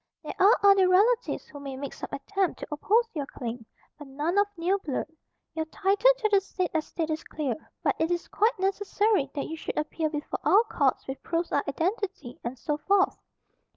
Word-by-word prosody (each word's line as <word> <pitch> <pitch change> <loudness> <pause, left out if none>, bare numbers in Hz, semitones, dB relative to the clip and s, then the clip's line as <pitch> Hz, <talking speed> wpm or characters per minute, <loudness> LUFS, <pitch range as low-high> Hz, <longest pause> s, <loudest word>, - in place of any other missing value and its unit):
"There - - -5
are 400 +5 +6
other 395 -2 +6
relatives 440 +6 +3
who 285 - -11
may 275 -2 -6
make 280 0 -5
some - - -7
attempt 375 +6 -1
to - - -6
oppose 435 +10 +2
your 290 -4 -3
claim; 235 -4 -6 0.3
but 295 - -9
none 300 +8 0
of 405 - +3
near 365 +4 +1
blood. 290 -8 -3 0.5
Your 320 -1 -2
title 395 +8 +3
to 440 -3 0
the 400 -1 +5
said 370 -2 -3
estate 320 0 -2
is 315 +1 -3
clear; 290 -5 -2 0.3
but - - +1
it 320 +1 +1
is 350 -1 -1
quite 440 +3 +1
necessary 390 -3 +1
that 280 - -2
you 320 - -5
should 320 - -6
appear 305 +1 -1
before 295 -1 -4
our 425 +3 +5
Courts 280 - 0
with 265 0 -5
proofs 335 0 -2
of 285 - +2
identity, 330 - -3
and 240 +2 -4
so 295 +5 -2
forth. 390 +3 +3
335 Hz, 195 wpm, -27 LUFS, 290-395 Hz, 0.5 s, are